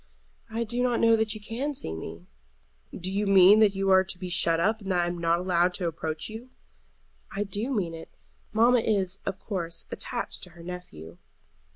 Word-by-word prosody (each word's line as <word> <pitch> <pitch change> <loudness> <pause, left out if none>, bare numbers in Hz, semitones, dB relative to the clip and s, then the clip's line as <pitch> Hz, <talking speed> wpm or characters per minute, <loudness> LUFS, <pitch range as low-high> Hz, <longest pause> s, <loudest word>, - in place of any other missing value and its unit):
"I 225 +1 -2
do 240 +2 -1
not 245 -1 +1
know 230 0 +5
that 220 -1 0
you - - -7
can 250 +8 -4
see 80 - -4
me." 80 +1 -8 0.7
"Do 185 +1 -5
you 205 +1 -1
mean 195 +2 +7
that 210 -2 +4
you 195 0 +1
are 190 0 +6
to 190 -1 -6
be 180 -1 -6
shut 165 -2 +3
up, 215 +6 +1
and 195 -1 -4
that 180 -1 +2
I - - +1
am 175 0 -3
not 165 0 +2
to - - -2
be - - -9
allowed 180 0 +2
to 180 - -2
approach 160 -1 -3
you?" 225 +4 -9 0.8
"I 200 - -2
do 205 +5 -3
mean 190 -9 -1
it. 165 0 -9 0.4
Mamma 235 +3 +4
is, 195 -4 0
of 195 -1 -2
course, 170 -5 -4
attached - - -4
to 180 - -7
her 170 - -11
nephew." 90 - -9
190 Hz, 215 wpm, -27 LUFS, 170-220 Hz, 0.8 s, mean